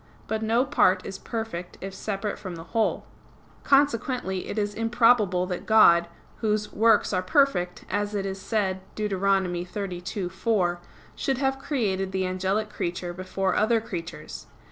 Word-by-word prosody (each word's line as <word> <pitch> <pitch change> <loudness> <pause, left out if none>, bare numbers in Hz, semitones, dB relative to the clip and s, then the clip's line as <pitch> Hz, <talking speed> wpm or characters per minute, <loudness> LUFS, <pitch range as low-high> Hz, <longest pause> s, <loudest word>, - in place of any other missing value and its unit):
But 220 0 -2
no 230 +4 +2
part 185 -6 +3
is 195 - -6
perfect 220 -7 -5
if 195 0 -6
separate 205 +1 -3
from 185 -4 -6
the 165 - -8
whole. 225 -2 +1 0.6
Consequently 250 -8 +1
it - - -5
is 205 -1 0
improbable 225 -5 +3
that 180 -1 -5
God, 170 -6 +6 0.3
Whose 210 -1 -1
"works 220 -1 +4
are 185 - +2
perfect," 185 -4 +1
as 205 0 -2
it 200 -1 -1
is 195 0 -4
said 190 -4 -1
Deut. 210 -1 -2
32:4, 185 0 -1 0.4
should 270 -2 -1
have 270 0 0
created 205 -10 -1
the 190 0 0
angelic 190 +3 -1
creature 175 -2 -3
before 185 +1 -2
other 225 +2 +3
creatures. 170 -7 -7
195 Hz, 145 wpm, -26 LUFS, 185-220 Hz, 0.6 s, God